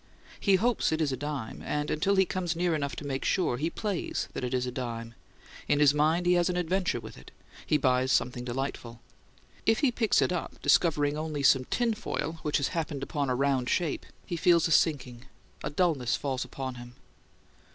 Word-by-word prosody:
He 200 -2 +4
hopes 230 +1 +1
it 160 - 0
is 155 -3 +1
a - - -1
dime, 140 -4 -5
and, 150 0 -2
until 195 +6 +1
he 190 0 +4
comes 175 -2 -2
near 175 0 +1
enough 140 -3 -2
to - - -7
make 135 -1 -3
sure, 175 -10 +1
he 155 +5 -1
plays 205 0 -3
that - - -4
it 125 - -2
is 125 -1 0
a 125 - -3
dime. 115 -2 -5 0.5
In 145 - +2
his 145 -1 +6
mind 155 +4 +2
he 180 - +4
has 175 0 +2
an 180 - -1
adventure 180 -5 0
with 110 -1 -10
it: - - -14 0.4
he 150 - +3
buys 130 -2 +2
something 125 0 +1
delightful. 125 -2 -4 0.7
If 225 +2 +3
he 280 -4 +3
picks 230 -3 +2
it - - +2
up, 180 - -4
discovering 150 -3 +3
only 155 -2 -3
some 130 0 +5
tin 235 - 0
foil 165 -6 -4
which 150 - +1
has 140 - 0
happened 155 -5 -3
upon 140 -1 -2
a 125 - +1
round 135 -1 +1
shape, 170 -5 -1 0.2
he 170 - -4
feels 170 0 +4
a - - -4
sinking. 130 -6 +1 0.4
A - - -2
dulness 150 -6 +1
falls 135 -2 -2
upon 130 -2 -6
him. 120 0 -12
150 Hz, 205 wpm, -29 LUFS, 130-175 Hz, 0.7 s, his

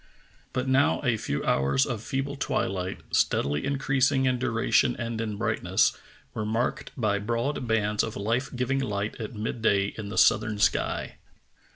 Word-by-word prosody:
But 125 +1 -2
now 135 +4 +3
a 125 -4 +2
few 70 -9 -3
hours 70 - +2
of 120 -5 -3
feeble 135 +4 -3
twilight, 95 -8 -2
steadily 75 +2 +1
in 140 0 0
creasing 135 0 +2
in 130 -1 +1
duration 120 0 +2
and 115 -2 -3
in 105 -2 -3
brightness, 110 0 +1 0.4
were 110 - -3
marked 115 +4 -1
by 105 -4 +1
broad 120 +5 -2
bands 105 -2 +1
of 110 - -3
life 115 +6 -1
giving 125 +2 0
light 105 -5 -2
at 110 +1 -6
mid 110 +2 -4
day 100 -2 +2
in 100 -2 -5
the 100 - -6
southern 110 +2 +4
sky. 105 - 0
115 Hz, 165 wpm, -27 LUFS, 105-130 Hz, 0.4 s, southern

